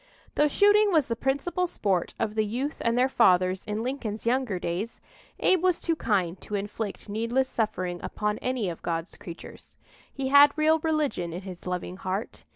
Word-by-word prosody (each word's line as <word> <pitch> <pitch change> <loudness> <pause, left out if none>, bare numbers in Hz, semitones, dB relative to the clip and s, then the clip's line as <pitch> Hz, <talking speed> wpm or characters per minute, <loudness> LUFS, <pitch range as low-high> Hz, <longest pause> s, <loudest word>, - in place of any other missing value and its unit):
Though 300 - +3
shooting 410 +6 +4
was 315 -6 +4
the 230 - -2
principal 285 +9 -1
sport 195 - -1
of 220 -2 -1
the 215 0 +1
youth 250 +8 -3
and 230 +1 +1
their 255 +1 +4
fathers 185 -7 +3
in 215 +1 -3
Lincoln's 240 -5 -4
younger 245 -4 +1
days, 180 +6 -4 0.4
Abe 370 -3 +3
was 365 -2 +2
too 330 - 0
kind 190 - -1
to 210 - -5
inflict 205 +2 -4
needless 230 +5 0
suffering 185 -7 -2
upon 210 0 -2
any 250 -5 -1
of 170 -2 -5
God's 165 +1 -3
creatures. 170 -1 -11 0.3
He 270 -1 -3
had 285 +2 +7
real 315 +1 +4
religion 300 - -1
in 180 - -5
his 185 -2 -9
loving 180 0 -4
heart. 190 +3 -4
225 Hz, 175 wpm, -27 LUFS, 190-280 Hz, 0.4 s, had